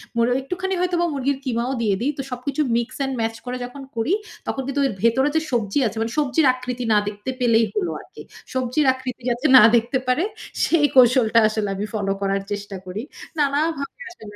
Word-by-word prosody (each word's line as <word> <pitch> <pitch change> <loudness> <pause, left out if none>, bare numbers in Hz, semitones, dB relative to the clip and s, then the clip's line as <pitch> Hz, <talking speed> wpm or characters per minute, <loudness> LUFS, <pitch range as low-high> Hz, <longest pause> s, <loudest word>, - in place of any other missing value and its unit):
মুর 235 0 +3
একটুখানি 365 +7 -3
হয়তোবা 350 -1 +1
মুরগির 275 0 0
কিমাও 240 +1 -1
দিয়ে 205 -3 +2
দেই। 285 +4 +1
তো - - -2
সবকিছু 270 +4 -2 0.2
মিক্স 235 +2 -3
অ্যান্ড 270 -1 -1
mash 225 0 -2
করে 250 0 -3
যখন 275 +3 -10
করি, 230 +11 0 0.3
তখন 270 - -2
কিন্তু 280 +1 -1
এর 230 - -4
ভেতরে 265 +5 +3
যে 320 - +3
সবজি 225 +1 0
আছে, 220 - -6
মানে 225 +1 -1
সবজির 290 +1 +2
আকৃতি 250 -1 -5
না - - +5
দেখতে 205 +4 -5
পেলেই 230 -2 +4
হলো 385 -4 0
আরকি। - - -13 0.3
সবজির 260 +3 0
আকৃতি 260 -1 -7
যাতে 240 +5 -2
না 215 - +9
দেখতে 235 +3 +1
পারে, 255 +8 +2 0.4
সেই 320 -3 +3
কৌশলটা 245 -2 +6
আসলে 215 -2 -2
আমি 205 +2 -3
ফলো 200 -2 -1
করার 195 0 0
চেষ্টা 205 -1 -4
করি। 195 +6 -5 0.4
নানাভাবে 290 - -1
আসলে 215 -12 -12
250 Hz, 190 wpm, -22 LUFS, 225-280 Hz, 0.4 s, না